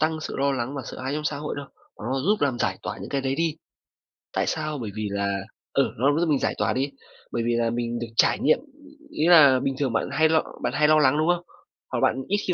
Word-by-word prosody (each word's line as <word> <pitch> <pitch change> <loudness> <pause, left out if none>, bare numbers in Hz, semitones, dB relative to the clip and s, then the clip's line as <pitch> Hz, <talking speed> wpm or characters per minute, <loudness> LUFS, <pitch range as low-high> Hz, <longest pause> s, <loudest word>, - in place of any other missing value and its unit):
tăng 155 0 0
sự - - -5
lo 140 0 +1
lắng 130 +2 -3
và 135 - -4
sợ - - -8
hãi 130 +2 -3
trong 150 0 -3
xã 150 - -1
hội 150 +1 -4
đâu, 145 - -6 0.3
mà - - -8
nó 135 - 0
giúp 205 +9 +1
làm 135 -4 +1
giải - - -1
tỏa - - -5
những - - -7
cái 140 -1 0
đấy 135 0 -1
đi. 165 -1 -1 0.8
Tại - - 0
sao? 155 -2 -2
Bởi 115 -5 -5
vì 110 -1 -2
là, 100 -1 -1 0.4
ừ, - - +2
nó 140 +6 +2
giúp 170 -1 +1
mình 145 - +3
giải - - 0
tỏa 100 -2 +1
đi. 135 +2 -1 0.4
Bởi 115 - -1
vì 120 - +1
là 115 -1 +1
mình 120 0 -2
được 120 - -4
trải - - +4
nghiệm, 155 - +3 0.5
ý 160 - 0
là 145 -7 +7
bình 135 0 -1
thường 130 -5 0
bạn - - 0
hay 160 +3 +3
lo 160 -1 +3 0.2
bạn - - -1
hay 150 0 +3
lo 155 0 +5
lắng, 145 0 +4
đúng 155 +2 +1
không? 175 0 +2 0.5
Hoặc - - -1
bạn - - +3
ít 205 - +1
khi 180 - +2
140 Hz, 275 wpm, -25 LUFS, 120-155 Hz, 0.8 s, là